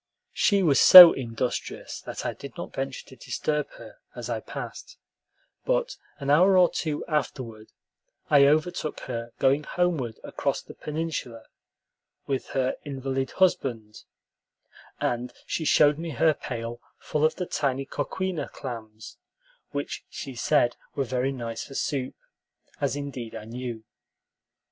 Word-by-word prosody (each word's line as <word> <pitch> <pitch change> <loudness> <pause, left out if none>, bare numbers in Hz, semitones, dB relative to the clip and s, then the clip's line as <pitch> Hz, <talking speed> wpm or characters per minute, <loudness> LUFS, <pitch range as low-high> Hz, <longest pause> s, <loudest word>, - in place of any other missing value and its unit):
She 200 -2 +3
was 145 -6 +4
so 180 -2 +12
industrious 120 -1 -4
that - - -5
I - - -1
did - - -11
not - - -7
venture - - -4
to - - -13
disturb 150 -1 -2
her, - - -13 0.2
as - - -5
I - - -1
passed; - - -8 0.7
but - - 0 0.2
an 140 -1 -2
hour 185 +6 +6
or 180 -1 +5
two 155 -3 -3
afterward 125 -7 -3 0.6
I 140 -2 +6
overtook 155 +1 0
her 120 -2 -5
going 135 +2 +3
homeward 155 -10 -1
across - - -2
the - - -12
peninsula 150 -7 -5 0.8
with 135 -2 -2
her 130 -1 -1
invalid 135 -2 -3
husband, 120 - 0 1.0
and 120 +1 -2
she 160 - -3
showed 150 0 +4
me 165 0 -4
her 155 +3 +3
pail 120 -3 -6 0.2
full 150 - -2
of 155 - +3
the 180 - -3
tiny 135 -4 -1
coquina 185 +4 -3
clams, 110 -4 -8 0.5
which 145 -1 -5
she 135 - -7
said 120 0 +2 0.2
were 140 - 0
very 130 +1 -1
nice 120 -4 -5
for 135 - -11
soup, 135 -3 -2 0.6
as - - 0
indeed 135 -5 -6
I 105 - -7
knew. 120 -1 -6
135 Hz, 140 wpm, -26 LUFS, 120-155 Hz, 1.0 s, so